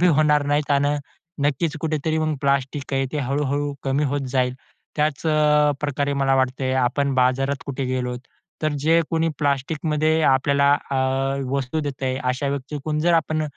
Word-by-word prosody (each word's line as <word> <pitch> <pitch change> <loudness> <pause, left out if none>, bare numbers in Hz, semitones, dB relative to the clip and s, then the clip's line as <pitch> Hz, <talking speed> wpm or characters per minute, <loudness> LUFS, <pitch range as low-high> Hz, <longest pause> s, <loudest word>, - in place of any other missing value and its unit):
बी 180 - +5
होणार 150 -2 +3
नाही. 145 +1 +2
त्यानं 145 +1 +2 0.5
नक्कीच 150 +3 0
कुठेतरी 155 0 -1
मग 155 -1 0
प्लास्टिक 140 0 -1
आहे. 135 0 +1
ते 150 - -1
हळू-हळू 145 +1 -1
कमी 135 +2 +1
होत 140 +1 -1
जाईल. 125 -1 +1 0.4
त्याचप्रकारे 150 -2 +1
मला 135 -1 +2
वाटतंय, 130 0 0
आपण 130 +2 +1
बाजारात 130 +2 +2
कुठे 135 -1 -3
गेलो, 125 -1 -2 0.5
तर 155 -1 +1
जे 165 +2 +4
कोणी 165 0 +1
प्लास्टिकमध्ये 155 +2 0
आपल्याला 140 +1 +3 0.2
अ, 135 - 0 0.6
वस्तू 140 +2 -1
देतंय. 135 -3 -3
अशा 130 +2 0
व्यक्तीकडून 140 +2 -3
जर 170 +1 +3
आपण 155 -1 +1
145 Hz, 145 wpm, -22 LUFS, 135-150 Hz, 0.6 s, बी